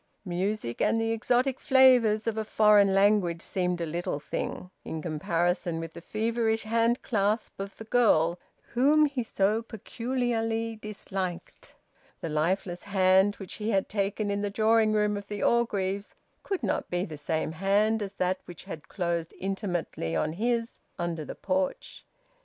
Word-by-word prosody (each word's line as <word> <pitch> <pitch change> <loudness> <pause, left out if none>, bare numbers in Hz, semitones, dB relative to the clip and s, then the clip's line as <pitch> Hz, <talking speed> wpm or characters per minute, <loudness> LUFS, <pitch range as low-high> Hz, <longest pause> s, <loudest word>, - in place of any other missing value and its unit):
Music 180 - -2
and 225 - +3
the 225 0 0
exotic 245 +3 +1
flavours 250 -6 +5
of 225 -2 -1
a 220 - -1
foreign 210 -2 +5
language 195 -3 +3
seemed 180 -1 -1
a 170 - -1
little 165 -2 -3
thing, 180 +4 -5
in 160 - -5
comparison 170 +2 -1
with 165 0 -6
the 170 - -9
feverish 225 +3 0
hand 230 +2 +1
clasp 215 -2 0
of 195 0 -6
the - - -8
girl 180 -8 +3 0.3
whom 290 +5 +5
he 275 -3 -2
so 215 -1 +1
peculiarly 230 0 -2
disliked. 195 -4 -6 0.4
The 165 - -4
lifeless 175 +3 -1
hand 190 0 +4
which 195 -3 -8
he 210 - -1
had 195 -3 +1
taken 205 0 -1
in 200 0 -1
the 205 - -1
drawing 220 +1 +3
room 210 -1 +1
of 200 0 -8
the 205 0 -4
Orgreaves 200 -4 0 0.3
could 390 -2 -3
not - - -1
be 180 +1 -1
the 155 - -8
same 155 +2 -2
hand 205 +6 +2
as 200 -1 -5
that 185 0 0
which 175 -4 -9
had 160 +2 -8
closed 170 -3 -2
intimately 180 - -3
on 80 - 0
his 230 +4 -1 0.2
under 170 -3 -3
the - - -7
porch. 185 -1 -3
200 Hz, 160 wpm, -28 LUFS, 175-225 Hz, 0.4 s, flavours